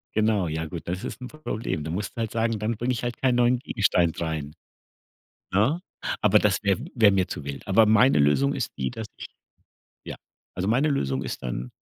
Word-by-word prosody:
Genau, 105 -4 +2
ja 80 +1 -2
gut, 85 +1 -7
das 90 +2 -3
ist - - -6
'n 125 - -6
Problem. 115 - -4
Du 80 - -4
musst 100 +3 -4
halt 115 -2 -2
sagen, 115 -1 0
dann 110 +2 -2
bringe 120 +3 -1
ich 120 - -4
halt 120 -1 -3
keinen 125 -2 +2
neuen 125 +1 +3
Gegenstand 95 - +1
rein. 80 -3 -3 1.0
Ne, 115 - +2 0.4
aber - - +5
das - - +1
wäre 100 0 +2 0.2
wäre 110 -5 +6
mir 95 -2 +2
zu - - -6
wild. 70 -1 -7
Aber 110 +3 +5
meine 110 - +5
Lösung 70 -1 +3
ist - - -3
die, 65 -1 -2
dass 110 -1 -6
ich - - -8 0.8
ja, - - -6 0.4
also, 90 +1 -2
meine 130 +7 +3
Lösung 70 - 0
ist - - -5
dann, - - -4
105 Hz, 205 wpm, -25 LUFS, 80-115 Hz, 1.0 s, wäre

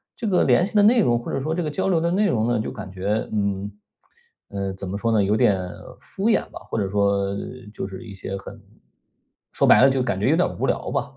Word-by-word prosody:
这 230 - -4
个 190 -3 +3
联 175 - +4
系 210 - -8
的 205 - +6
内 230 +4 +5
容 120 - +2
或 120 - -6
者 - - -1
说 155 +4 -2
这 175 - -1
个 155 - -2
交 190 +5 -1
流 175 -3 +3
的 170 - +1
内 205 +3 +2
容 115 -7 +1
呢， 120 -2 +1
就 - - -4
感 95 - -8
觉， 100 +3 -2
嗯， 100 -1 -1 0.8
呃， 100 -1 -3
怎 95 0 -7
么 100 - -3
说 115 +2 0
呢， 110 -2 +3
有 100 +2 +2
点 100 -3 +3 0.4
敷 200 +4 -2
衍 225 - +3
吧， - - -9
或 - - -3
者 100 -2 -1
说 100 0 +1 0.4
就 95 - -5
是 95 +5 -9
一 105 - -9
些 95 0 -6
很 95 - -10 0.9
说 - - +2
白 - - +7
了 135 - +7
就 135 -1 +1
感 110 -7 -2
觉 105 - +1
有 155 - +4
点 180 - +2
无 - - 0
聊 - - -1
吧。 - - -3
110 Hz, 275 characters per minute, -23 LUFS, 100-165 Hz, 0.9 s, 白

